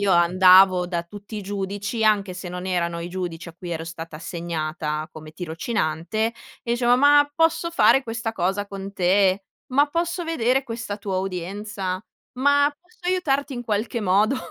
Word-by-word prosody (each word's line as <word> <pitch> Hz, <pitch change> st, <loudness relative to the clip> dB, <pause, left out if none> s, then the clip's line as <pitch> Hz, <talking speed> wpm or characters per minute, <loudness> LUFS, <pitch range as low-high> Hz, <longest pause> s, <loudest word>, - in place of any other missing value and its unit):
io 200 Hz, -2 st, +2 dB
andavo 185 Hz, +1 st, +6 dB
da 175 Hz, -1 st, -2 dB
tutti 205 Hz, +5 st, -10 dB
i -, -, -3 dB
giudici, 205 Hz, +3 st, -3 dB
anche 200 Hz, -3 st, +2 dB
se 180 Hz, -1 st, -7 dB
non 180 Hz, +1 st, -5 dB
erano 170 Hz, -2 st, -1 dB
i 170 Hz, -, -5 dB
giudici 175 Hz, -2 st, -5 dB
a 165 Hz, -, -12 dB
cui 175 Hz, 0 st, -8 dB
ero 165 Hz, -1 st, -3 dB
stata 165 Hz, -1 st, -8 dB
assegnata 155 Hz, -2 st, -4 dB
come 155 Hz, -1 st, -11 dB
tirocinante, 170 Hz, +4 st, -2 dB, 0.3 s
e 235 Hz, -, -1 dB
dicevo: 240 Hz, 0 st, +3 dB
"Ma 290 Hz, +1 st, +6 dB
posso 330 Hz, +1 st, +2 dB
fare 280 Hz, -4 st, +5 dB
questa 225 Hz, -2 st, -4 dB
cosa 195 Hz, +1 st, -1 dB
con 195 Hz, 0 st, -7 dB
te? 190 Hz, +1 st, +2 dB, 0.3 s
Ma 285 Hz, +3 st, +5 dB
posso 340 Hz, +2 st, -2 dB
vedere 270 Hz, -5 st, +1 dB
questa 230 Hz, -4 st, -5 dB
tua 195 Hz, -2 st, -3 dB
udienza? 190 Hz, +1 st, -4 dB, 0.3 s
Ma 285 Hz, +2 st, +3 dB
posso 360 Hz, +6 st, -28 dB
aiutarti 285 Hz, -6 st, 0 dB
in 245 Hz, -, -5 dB
qualche 225 Hz, +2 st, -1 dB
modo?" 205 Hz, +6 st, +3 dB
195 Hz, 165 wpm, -23 LUFS, 175-235 Hz, 0.3 s, andavo